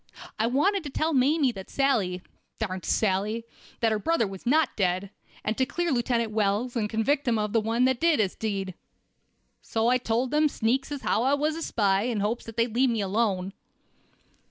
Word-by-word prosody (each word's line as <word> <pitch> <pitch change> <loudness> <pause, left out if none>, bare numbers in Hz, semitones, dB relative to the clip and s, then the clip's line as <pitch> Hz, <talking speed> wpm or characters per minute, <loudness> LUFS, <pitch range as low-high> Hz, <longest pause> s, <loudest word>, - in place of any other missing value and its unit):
I 220 - +2
wanted 360 - +1
to - - -4
tell 315 +4 -1
Mamie 275 +1 +3
that 190 -4 -9
Sally—darn 195 -5 -2
Sally—that 220 +4 -1
her 215 - 0
brother 330 +2 +1
was 195 +2 -8
not 305 +2 +3
dead, 185 0 0 0.3
and 215 - -1
to 260 - +3
clear 345 -1 -1
Lieutenant 240 -3 0
Wells 215 +4 0
and 215 -3 0
convict 265 +7 +1
the 240 -2 +2 0.3
one 230 +4 +2
as 260 - +2
did 330 0 +2
the 200 -4 +1
deed. 195 -4 -2 0.9
So 225 +1 0
I 255 +1 +3
told 240 +2 -1
them 300 0 +3
sneaks 260 +3 -1
as 285 -2 -5
how - - +1
I 270 +3 +3
was 305 +2 0
a 330 - -5
spy, 200 -7 +1
in 240 -4 -1
hopes 215 +4 -1
they'd 230 0 -2
let 260 +1 +4
me 230 -2 0
alone." 195 -2 0
230 Hz, 180 wpm, -26 LUFS, 210-270 Hz, 0.9 s, let